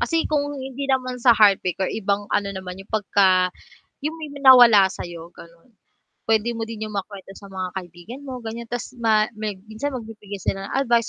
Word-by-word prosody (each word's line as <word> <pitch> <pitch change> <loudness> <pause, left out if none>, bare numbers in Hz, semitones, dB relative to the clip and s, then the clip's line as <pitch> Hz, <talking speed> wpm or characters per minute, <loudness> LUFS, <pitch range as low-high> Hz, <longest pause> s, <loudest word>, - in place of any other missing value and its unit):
kasi 330 -1 +1
kung 290 -1 0
hindi 270 +1 -5
naman 255 -1 0
sa 235 -2 +5
heartbreak 195 -4 +4
or 190 - 0
ibang 205 -1 -1
ano 200 - +1
naman, 185 -1 -7
yung 195 - -14
'pag 215 -2 -2
ka 200 -1 +6 0.7
'yung 310 +3 -3
may 310 -2 -7
ma 285 - -9
nawala 230 -6 +8
sa'yo 170 -3 -8
gano'n. 170 +6 -16 0.6
P'wede 225 +1 +2
mo 225 - -4
din 220 -1 -5
'yong 215 - -8
makuwento 195 -1 -6
sa 200 - -13
mga 185 -1 -4
kaibigan 180 +8 -8
mo, 255 -1 -6
ganiyan, 230 +1 -6
'tas 245 +1 -4
ma 215 -2 +3
meg 210 -2 -4
minsan 220 +7 -4
magbibigay 210 -4 -8
sila 195 0 -2
ng - - -6
advice 235 -2 +2
215 Hz, 200 wpm, -23 LUFS, 195-250 Hz, 0.7 s, nawala